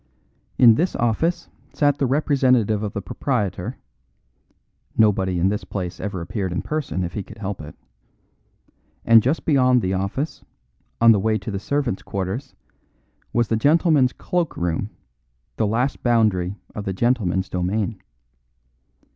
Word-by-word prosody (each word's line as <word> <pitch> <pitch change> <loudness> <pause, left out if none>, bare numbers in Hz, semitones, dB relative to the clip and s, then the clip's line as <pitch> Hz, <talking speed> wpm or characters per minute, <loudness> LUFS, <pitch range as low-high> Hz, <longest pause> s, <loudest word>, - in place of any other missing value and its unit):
In 120 -3 +8
this 170 +11 0
office 165 +10 0 0.3
sat 145 -1 +2
the 135 - +2
representative 130 -6 +2
of 105 -2 -4
the 100 - -4
proprietor 105 0 -2 1.2
(nobody 95 -4 +3
in 90 +3 +2
this 105 +1 -2
place 90 -3 -5
ever 95 -3 -4
appeared 95 +2 -3
in 90 - -2
person 150 -12 -2
if 85 - -4
he 105 - -3
could 105 +3 -12
help 100 -3 -5
it), 75 - -10 1.3
and 115 -1 +7
just 135 +8 -1
beyond 130 -5 +3
the 95 +1 0
office, 100 +11 -3 0.6
on 115 0 +7
the 105 - +4
way 110 +2 +1
to 110 - -6
the 100 - -3
servants' 140 -2 -1
quarters, 100 +8 -4 0.8
was 120 -2 +1
the 115 - +2
gentlemen's 145 0 +3
cloak 175 +3 -2
room, 85 +4 -1 0.7
the 110 - +1
last 125 +6 -1
boundary 105 -6 +2 0.2
of 105 - -6
the 95 - -2
gentlemen's 95 -4 0
domain. 95 +3 -2
110 Hz, 145 wpm, -22 LUFS, 95-130 Hz, 1.3 s, In